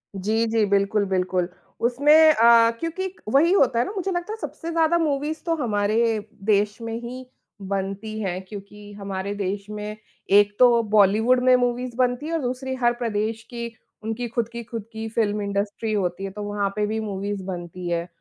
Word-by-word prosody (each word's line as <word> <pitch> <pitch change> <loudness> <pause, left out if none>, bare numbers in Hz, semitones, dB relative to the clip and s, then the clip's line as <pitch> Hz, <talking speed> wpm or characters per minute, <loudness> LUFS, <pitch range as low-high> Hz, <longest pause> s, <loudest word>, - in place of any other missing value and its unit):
जी, 215 +4 0
जी, 225 -1 +2
बिल्कुल, 200 +1 +2
बिल्कुल, 185 -2 0 0.3
उसमें 295 +6 +5
अ, 230 -2 +6
क्योंकि 365 +3 -3 0.2
वही 310 +6 +5
होता 265 -10 +3
है 240 - +2
ना, - - -5
मुझे 385 0 -2
लगता 350 +4 -3
है 445 - -6
सबसे 330 - -6
ज़्यादा 330 0 +3
मूवीज़ 300 -1 -1
तो 335 -1 +1
हमारे 220 -3 +1 0.2
देश 205 +1 +1
में 225 0 -4
ही 250 +2 -7 0.4
बनती 195 +3 -4
हैं, 185 -3 -2
क्योंकि 205 +1 -10
हमारे 195 0 -4
देश 200 0 -3
में 210 0 -5 0.4
एक 205 0 +2
तो 240 -2 +6
बॉलीवुड 215 +4 +4
में 255 0 +6
मूवीज़ 245 0 -1
बनती 250 +2 +1
है 330 - -3
और 330 - +1
दूसरी 255 +1 -3
हर 240 -2 +2
प्रदेश 225 -1 -2
की 235 -1 -5 0.3
उनकी 225 +2 -3
खुद 230 0 -2
की 235 0 -7
खुद 230 -1 -6
की 220 0 -5
फ़िल्म 210 -2 0
इंडस्ट्री 205 +2 -2
होती 185 -2 -1
है, 195 - -4
तो 205 +1 -6
वहाँ 205 -1 -1
पे 210 0 +1
भी 220 +1 -2
मूवीज़ 200 -2 -4
बनती 180 -1 -6
है। 170 0 -1
220 Hz, 185 wpm, -24 LUFS, 200-250 Hz, 0.4 s, अ